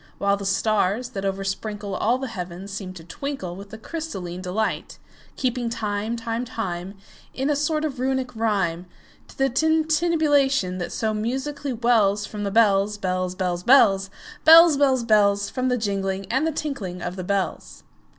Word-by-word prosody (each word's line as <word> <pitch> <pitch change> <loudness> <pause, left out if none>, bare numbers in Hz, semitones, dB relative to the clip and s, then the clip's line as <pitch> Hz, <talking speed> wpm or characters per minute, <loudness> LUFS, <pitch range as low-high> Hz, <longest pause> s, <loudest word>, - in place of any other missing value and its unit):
While 200 0 +2
the 200 -1 -4
stars, 215 +3 +1
that 195 -5 -5
oversprinkleAll 200 +4 -2
the - - -2
heavens, 185 -1 -7
seem 195 -2 -5
to 170 -3 -11
twinkleWith 195 - -6
a 220 - -8
crystalline 200 - -6
delight; 195 +4 -2 0.4
Keeping 250 -2 -1
time, 220 -1 -2
time, 230 +1 -3
time, 195 -6 -5 0.4
In 270 +3 0
a - - +2
sort 305 +2 0
of 275 -4 -4
Runic 260 -1 -1
rhyme, 190 -6 0 0.4
To - - -17
the 270 - +3
tintinnabulation 305 - +2
that 175 - -4
so 220 -1 -1
musically 270 +6 -3
wellsFrom 210 -3 +1
the 200 - -1
bells, 205 -1 +3
bells, 185 -1 -2
bells, 180 -2 -2
bells, 195 -7 +5 0.3
Bells, 330 0 +9
bells, 265 -3 +3
bells—From 210 +3 +2
the 250 - +1
jingling 195 -3 -2
and 265 +6 +1
the - - 0
tinkling 230 - -4
of 175 +1 -4
the 185 - -5
bells. 195 +1 -3
215 Hz, 150 wpm, -23 LUFS, 195-265 Hz, 0.4 s, Bells